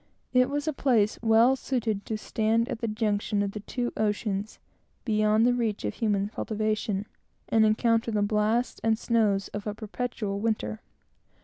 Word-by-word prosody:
It 250 0 +4
was 290 +2 -2
a 310 - +1
place 230 -7 +2
well 230 +3 +5
suited 225 -6 -2
to 220 - -2
stand 225 +2 0
at - - -4
the 230 - -2
junction 210 -1 0
of 200 - -2
the 210 - -6
two 240 +4 -3
oceans, 210 -1 -1 0.5
beyond 215 0 +3
the 245 - +4
reach 225 - -1
of 105 - -2
human 205 -2 0
cultivation, 215 -2 -2 0.4
and 220 -1 +4
encounter 225 +1 +2
the 210 -2 +1
blasts 215 +4 0
and 225 -1 +2
snows 215 -5 +1
of 205 +1 -6
a 210 - -3
perpetual 215 -2 -4
winter. 205 - -2
215 Hz, 165 wpm, -27 LUFS, 210-230 Hz, 0.5 s, well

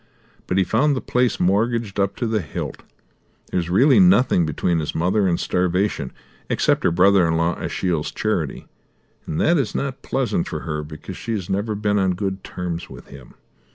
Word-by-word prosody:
But 90 - 0
he 95 - +4
found 140 +10 +2
the - - -1
place 125 -3 0
mortgaged 105 +2 +1
up 100 0 +1
to 120 - -2
the 110 -2 0
hilt. 75 - -6 0.7
There - - +1
is 85 -1 -3
really 130 - +5
nothing 130 - +4
between 80 +2 0
his 75 - -4
mother 95 +4 +2
and 85 -2 +1
starvation, 90 -6 0 0.4
except - - +1
her - - +4
brother 90 +1 +4
in 80 0 +1
law 85 +1 +1
Ashiel's 85 -5 -2
charity, 90 -10 -2 0.6
and 75 - -3
that 170 -1 +3
is 130 - -2
not 135 -1 -3
pleasant 125 -9 -1
for - - -4
her 75 -1 -3
because 75 0 -9
she 115 - -4
has 100 -3 -4
never 105 +3 -1
been 105 0 +1
on 95 -2 +1
good 95 0 -3
terms 90 -2 -5
with - - -12
him. 70 -3 -13
95 Hz, 190 wpm, -22 LUFS, 85-110 Hz, 0.7 s, really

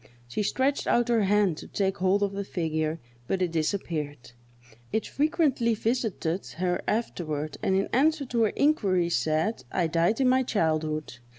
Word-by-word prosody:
She 120 - -2
stretched 265 +7 0
out 240 0 +2
her 225 -4 +3
hand 200 -4 +2
to - - -9
take 195 -1 -1
hold 190 +2 +2
of 200 - 0
the 200 0 -3
figure, 160 -3 -2 0.3
but 190 - 0
it 175 - -1
disappeared. 155 -5 -3 0.6
It 220 - 0
frequently 285 -7 +1
visited 215 -6 -1
her 180 0 0
afterward, 155 -9 -2
and 190 - +1
in 195 +1 +2
answer 295 +3 +3
to 240 -2 -1
her 210 - -1
inquiries 190 - +2
it 120 - +2
said, 155 - 0
"I 180 - +1
died 170 +7 +1
in 265 - +3
my 260 +1 +4
childhood!" 155 - -1
195 Hz, 170 wpm, -27 LUFS, 160-235 Hz, 0.6 s, my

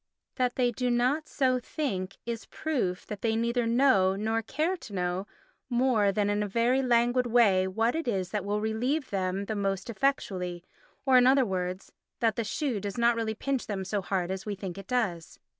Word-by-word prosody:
That 250 -2 +1
they 245 -2 +2
do 250 +1 -1
not 255 +6 +1
so 255 -2 +1
think 215 - -3
is 230 -1 -5
proof 240 -13 -2
that 210 -2 -7
they 225 -1 +1
neither 235 +1 0
know, 230 -6 +4
nor 220 +3 0
care 310 - -1
to 230 - -11
know, 180 +1 -2 0.4
more 240 -5 +3
than 205 0 0
in 205 0 +1
a 210 - -1
very 235 +6 +2
languid 245 0 +2
way, 205 -6 +4
what 225 +5 +1
it 325 -2 -3
is 190 -5 -1
that 210 -3 -2
will 205 +1 -1
relieve 250 +7 -1
them 190 0 -1
most 195 +1 -2
effectually 185 -8 -1 0.4
or, 260 -2 +6
in 250 - +5
other 265 0 +5
words, 185 -2 -3 0.3
that 225 -2 +2
the 230 - -1
shoe 240 +1 -2
does 200 +1 -5
not 235 0 +4
really 225 -1 -2
pinch 270 +2 -2
them 195 -3 -3
so 200 +1 -1
hard 185 -1 -1
as 190 0 -4
we 210 -1 -4
think 190 -1 -6
it 195 - -11
does. 210 -10 -2
225 Hz, 195 wpm, -28 LUFS, 195-250 Hz, 0.4 s, or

